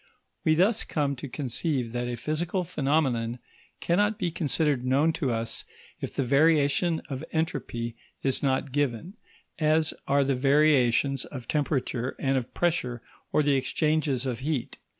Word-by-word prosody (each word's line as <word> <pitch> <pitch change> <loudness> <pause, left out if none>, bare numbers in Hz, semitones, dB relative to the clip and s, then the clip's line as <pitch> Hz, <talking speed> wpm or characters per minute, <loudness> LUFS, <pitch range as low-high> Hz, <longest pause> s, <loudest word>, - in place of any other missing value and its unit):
We 155 - +4
thus 205 +7 +3
come 145 -3 -1
to 140 - -7
conceive 130 -1 -2
that 120 +1 -2
a 120 - -2
physical 165 - -1
phenomenon 135 -7 0 0.4
cannot 205 +5 +1
be 175 -3 -1
considered 150 -5 +1
known 140 +5 +3
to 140 -6 -1
us 115 -1 -2 0.4
if - - -6
the 140 - +1
variation 150 +4 +3
of 135 0 -5
entropy 125 -7 -2 0.3
is 135 -1 0
not 135 0 0
given, 145 - -1 0.5
as 155 0 +2
are 140 0 +3
the 135 0 +1
variations 135 -1 +3
of 125 -4 -8
temperature 135 -4 -1
and 135 0 0
of 130 -2 -2
pressure 125 -9 0 0.3
or 150 - +3
the 145 -1 +3
exchanges 140 0 +1
of 125 -3 -2
heat. 140 -2 -3
140 Hz, 150 wpm, -27 LUFS, 125-155 Hz, 0.5 s, We